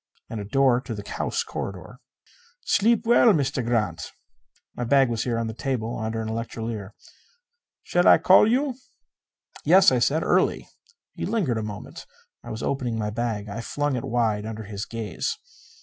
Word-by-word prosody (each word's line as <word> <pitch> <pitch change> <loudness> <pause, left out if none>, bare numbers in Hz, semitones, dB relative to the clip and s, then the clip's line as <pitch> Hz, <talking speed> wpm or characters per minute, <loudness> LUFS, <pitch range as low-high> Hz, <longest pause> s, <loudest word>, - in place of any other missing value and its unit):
And 115 - -4
a 100 - -5
door 125 +2 +3
to 120 -3 -6
the 105 -1 -8
house - - -2
corridor. 95 +5 -7 0.7
"Sleep 230 +2 +2
well, 235 0 +6
Meester 140 -4 0
Grant." 115 -8 -1 0.6
My 120 - -4
bag 135 +1 +4
was 115 -1 -2
here 120 -2 -1
on 115 - -1
the 110 - -4
table 120 -1 -3
under 110 0 -3
an - - -5
electrolier. 110 -2 -5 0.9
"Shall 175 0 +2
I - - +8
call 190 +3 +6
you?" 270 +2 +1 0.9
"Yes," - - +6
I - - +2
said. - - +1
"Early." - - +1 0.5
He - - -4
lingered 160 - 0
a - - -3
moment. 105 -1 -8 0.4
I - - -9
was 110 - -5
opening 125 -4 -2
my 105 -1 -2
bag. 110 -2 -3
I 105 +3 -5
flung 145 +3 -2
it 120 - -3
wide 110 -3 0
under 110 0 -6
his 100 -1 -6
gaze. 110 -5 -4
115 Hz, 170 wpm, -25 LUFS, 110-135 Hz, 0.9 s, I